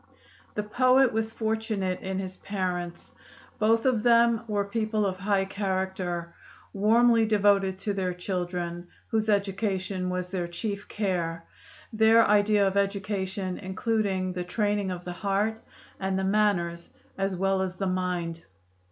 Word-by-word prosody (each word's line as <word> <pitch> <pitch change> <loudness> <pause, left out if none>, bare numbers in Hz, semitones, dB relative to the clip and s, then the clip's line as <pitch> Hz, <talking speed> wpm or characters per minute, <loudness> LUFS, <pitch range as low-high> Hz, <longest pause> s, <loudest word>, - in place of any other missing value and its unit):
The 210 - -1
poet 255 +4 +4
was 220 0 -1
fortunate 220 -4 -2
in 190 0 -4
his 185 -1 -5
parents: 180 -3 -4 0.5
both 225 +2 +3
of 250 -4 +3
them 235 0 +4
were 205 -2 0
people 215 0 -1
of 190 -1 -1
high 195 0 +1
character, 190 -3 -3 0.4
warmly 230 +3 +4
devoted 200 -3 +3
to 200 +2 -2
their 190 -2 -1
children, 175 -1 -3 0.2
whose 220 -1 0
education 195 -2 0
was 180 0 -3
their 180 -3 -2
chief 200 +3 -5
care, 175 -5 -2 0.5
their 220 +1 +6
idea 205 0 +4
of 195 0 0
education 195 -2 -2
including 190 -1 -1
the 180 0 -3
training 205 +1 0
of 180 -1 -5
the 180 - -4
heart 205 +4 -1 0.4
and 190 0 -1
the 190 - -1
manners 190 -4 +1 0.3
as 195 -1 -1
well 195 +1 +1
as 185 -1 -2
the 195 - -2
mind. 180 -3 -2
195 Hz, 140 wpm, -27 LUFS, 185-215 Hz, 0.5 s, their